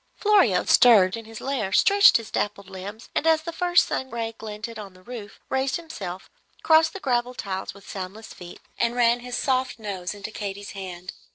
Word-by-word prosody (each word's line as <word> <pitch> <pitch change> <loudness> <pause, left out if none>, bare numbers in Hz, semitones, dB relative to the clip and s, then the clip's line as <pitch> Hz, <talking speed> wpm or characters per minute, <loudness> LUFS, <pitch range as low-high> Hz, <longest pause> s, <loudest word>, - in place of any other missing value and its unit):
Florio 385 - +3
stirred 200 -6 +6
in 225 -1 -8
his 225 0 -10
lair, 260 -8 -2
stretched 400 - +6
his 230 -2 -9
dappled 200 -1 -3
limbs, 200 +4 -8
and 325 - 0
as 320 -1 +4
the 335 +1 -5
first 350 0 +3
sun 260 - -3
ray 230 -1 -4
glinted 220 +1 -7
on 195 -3 -10
the 185 - -18
roof, 220 -2 -9
raised 265 0 0
himself, 195 - -7 0.4
crossed 320 0 +5
the 390 - -6
gravelled 250 -4 -1
tiles 190 -1 -4
with 200 - -16
soundless 195 +3 -7
feet, 175 -1 -11 0.2
and 235 0 +1
ran 240 0 +3
his 245 0 -5
soft 260 -1 0
nose 200 -4 -5
into 205 +1 -7
Katy's 200 -1 -6
hand. 185 -2 -8
225 Hz, 190 wpm, -24 LUFS, 195-260 Hz, 0.4 s, stirred